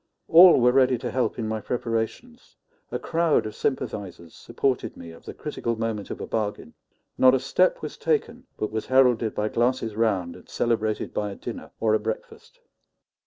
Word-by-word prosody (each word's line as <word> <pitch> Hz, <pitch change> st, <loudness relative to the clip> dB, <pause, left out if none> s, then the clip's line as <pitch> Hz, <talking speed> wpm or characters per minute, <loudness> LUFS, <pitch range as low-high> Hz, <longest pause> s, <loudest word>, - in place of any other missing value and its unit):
All 175 Hz, -1 st, +8 dB
were 125 Hz, 0 st, +5 dB
ready 130 Hz, -1 st, +3 dB
to -, -, -5 dB
help 130 Hz, 0 st, -1 dB
in 115 Hz, -2 st, -3 dB
my 110 Hz, 0 st, -3 dB
preparations; 120 Hz, -, -4 dB, 0.4 s
a -, -, -1 dB
crowd 165 Hz, -5 st, +1 dB
of 110 Hz, -, -5 dB
sympathizers 100 Hz, -, -4 dB
supported 130 Hz, -2 st, -2 dB
me 85 Hz, -1 st, -10 dB
at 80 Hz, -, -16 dB
the -, -, -7 dB
critical 115 Hz, 0 st, -3 dB
moment 110 Hz, -3 st, -3 dB
of -, -, -6 dB
a -, -, -4 dB
bargain; 105 Hz, -2 st, -3 dB, 0.5 s
not 130 Hz, 0 st, +6 dB
a -, -, +1 dB
step -, -, +1 dB
was -, -, -6 dB
taken 250 Hz, -, -1 dB
but 105 Hz, -, -3 dB
was 110 Hz, 0 st, -4 dB
heralded 125 Hz, -4 st, +3 dB
by 105 Hz, -, 0 dB
glasses 120 Hz, -1 st, 0 dB
round 100 Hz, -6 st, 0 dB
and -, -, -16 dB
celebrated 110 Hz, -2 st, -1 dB
by 105 Hz, -1 st, -2 dB
a 100 Hz, -, -7 dB
dinner -, -, -8 dB
or 110 Hz, -1 st, +2 dB
a 110 Hz, -, +3 dB
breakfast. 110 Hz, 0 st, -7 dB
115 Hz, 180 wpm, -25 LUFS, 110-130 Hz, 0.5 s, All